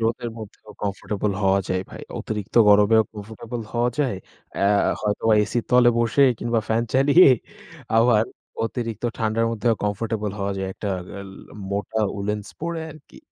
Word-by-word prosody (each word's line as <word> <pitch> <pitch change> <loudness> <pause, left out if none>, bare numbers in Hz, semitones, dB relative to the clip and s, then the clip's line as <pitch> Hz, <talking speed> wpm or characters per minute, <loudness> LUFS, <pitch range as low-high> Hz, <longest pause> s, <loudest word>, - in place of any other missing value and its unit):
রোদের 115 +1 -1
মধ্যেও 110 0 -11
কমফোর্টেবল 105 0 -2
হওয়া 95 0 +3
যায় 95 0 0
ভাই। - - -9 0.2
অতিরিক্ত 105 -2 -5
গরমেও 105 +2 +6
কমফোর্টেবল 110 +3 -7
হওয়া 120 +1 +1
যায়। 130 -9 +1 0.4
অ্যা 100 - +1 0.3
হয়তো 105 -1 -2 0.2
এসির 120 +3 -2
তলে 125 -1 +6
বসে 120 +4 +3 0.2
কিংবা 115 -1 0
ফ্যান 110 +1 +2
চালিয়ে, 140 +6 +6 0.7
আবার 115 -2 +4 0.4
অতিরিক্ত 115 -1 -4
ঠান্ডার 115 +1 +1
মধ্যেও 115 +1 +1
কমফোর্টেবল 105 +1 -2
হওয়া 100 0 -1
যায়। 95 0 -3
একটা 105 - -5 0.2
গেল 100 -1 -8 0.4
মোটা 100 +2 -2 0.2
উলেন্স 105 +1 -3
পরে 170 0 -3
আরকি। 155 -2 -15
110 Hz, 145 wpm, -23 LUFS, 105-120 Hz, 0.7 s, গরমেও